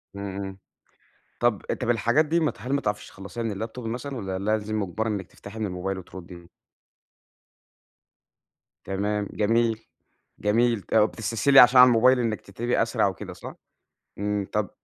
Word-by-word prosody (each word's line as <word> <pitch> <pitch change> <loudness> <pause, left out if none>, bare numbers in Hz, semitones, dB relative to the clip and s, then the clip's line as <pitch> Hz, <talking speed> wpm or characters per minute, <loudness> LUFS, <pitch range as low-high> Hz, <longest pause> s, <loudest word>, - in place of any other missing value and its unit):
إمم، 100 -1 -5
إمم، 95 -1 -6 0.8
طَب 120 -4 +2
أ - - +2
طَب 120 -2 -4
الحاجات 120 +6 +3
دي 165 +3 +1
ما 155 - +1
ت - - -23
هل 130 +4 -3
ما 140 - +1
تعرفش 105 0 -3
تخلّصيها 100 +5 -7
من 110 -1 -3
الlaptop 125 - -11
مثلًا 125 +4 -5
والّا 95 -3 -4
لازم 110 +1 -1
مُجبَرة 105 +3 -2
إنِك 100 -4 -3
تفتَحي 105 +2 -11
من 105 - -1
الmobile 95 +1 -4
وتردّي؟ 85 -1 -11 2.4
تمام 100 +1 -2
جميل، 115 +1 +1 0.5
جميل، 115 +1 +2
طَب 105 +4 +3
بتستسهلي 115 +6 +3
عشان 125 +1 +8
على 125 -1 +7
الmobile 125 +3 +5
إنِك 110 -3 -1
تكتبي 115 +6 -2
أسرع 115 -3 +1
وكده 95 - -6
صح؟ - - -10 0.6
إمم، 105 -1 -1
طَب 105 -2 0
110 Hz, 160 wpm, -25 LUFS, 100-120 Hz, 2.4 s, عشان